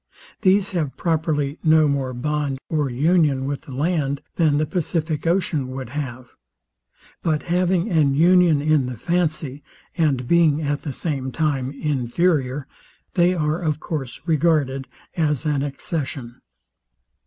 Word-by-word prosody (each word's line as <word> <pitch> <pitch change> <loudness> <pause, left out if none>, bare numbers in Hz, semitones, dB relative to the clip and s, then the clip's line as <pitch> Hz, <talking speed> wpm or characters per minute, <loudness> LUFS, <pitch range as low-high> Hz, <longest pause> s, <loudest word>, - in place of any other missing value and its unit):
These 195 +1 +3
have 160 -7 -2
properly 155 -3 0
no 155 -1 +5
more 140 -2 -1
bond 145 +2 -2
or 150 -3 0
union 145 0 +2
with 140 0 -3
the - - -12
land, 140 0 -1
than 155 -4 +3
the 155 - +1
pacific 160 -1 -2
ocean 165 -6 +1
would 130 -2 -6
have; 130 -3 -6 0.9
but 155 -3 0
having 180 0 +2
an 150 -5 +3
union 170 -2 +5
in 150 -4 +2
the 125 -2 -5
fancy, 155 -2 -1 0.3
and 140 -7 +1
being 160 -2 +4
at 145 0 -1
the 145 - -4
same 135 -2 -3
time 140 -4 -1
inferior, 140 0 0 0.5
they 180 0 +3
are 155 0 0
of 155 -3 -1
course 135 -8 -4
regarded 150 -5 +1 0.3
as 150 -6 0
an 145 -2 +1
accession. 135 -3 -4
150 Hz, 135 wpm, -22 LUFS, 135-165 Hz, 0.9 s, no